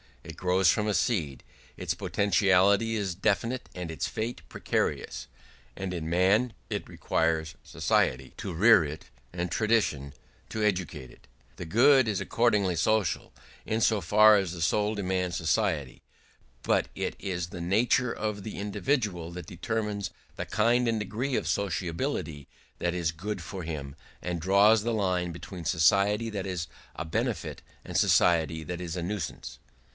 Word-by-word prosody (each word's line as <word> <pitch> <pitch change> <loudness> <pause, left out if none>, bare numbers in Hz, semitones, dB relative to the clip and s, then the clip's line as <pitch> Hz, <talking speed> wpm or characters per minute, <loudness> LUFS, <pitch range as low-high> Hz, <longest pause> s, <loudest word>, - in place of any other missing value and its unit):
It 80 -2 -9
grows 90 +1 +2
from 105 +5 +2
a 105 - +1
seed; 75 - 0 0.3
its - - -2
potentiality 100 +2 +2
is 100 -4 -1
definite 110 +7 -1
and 90 -2 -5
its 80 - -2
fate 115 +3 -4
precarious; - - -2 0.5
and 95 -1 -4
in 80 -2 -4
man 100 +8 +3 0.2
it - - -3
requires 80 -1 -1
society 65 +1 0
to 95 - -5
rear 105 +2 +6
it 75 +1 -6 0.3
and 85 0 -3
tradition 105 -12 +1 0.4
to 110 - -2
educate 90 -10 -1
it. - - -20 0.3
The 90 - -6
good 130 - +5
is 105 -3 0
accordingly 105 -6 +1
social, 110 -1 0 0.3
in 110 - -1
so 110 -1 +3
far 105 +5 +6
as 95 -4 -1
the 85 - -7
soul 105 +6 +1
demands 90 -3 -1
society; 75 -5 0 0.6
but - - +2
it - - -3
is 90 -3 -3
the 85 0 -8
nature 115 +7 +2
of 105 -1 -3
the 110 - -6
individual 105 - -1
that 85 -2 -8
determines 100 0 -3 0.3
the - - -4
kind 120 +3 +2
and 115 -1 +1
degree 115 +6 -2
of 85 - -1
sociability 85 - -2 0.3
that 85 0 -1
is 85 -3 0
good 100 +7 -5
for 95 -3 -6
him, 75 -4 -5 0.3
and 90 -2 -3
draws 100 +5 +5
the 115 +2 -1
line 90 -4 0
between 85 0 -8
society 100 +7 +3
that 100 -2 -4
is 90 -4 -3 0.3
a 80 - -4
benefit 80 - -2 0.2
and - - -3
society 80 -2 +3
that 90 +3 -5
is 85 -1 -4
a 90 - -3
nuisance. 85 -10 -5
95 Hz, 155 wpm, -28 LUFS, 85-105 Hz, 0.6 s, rear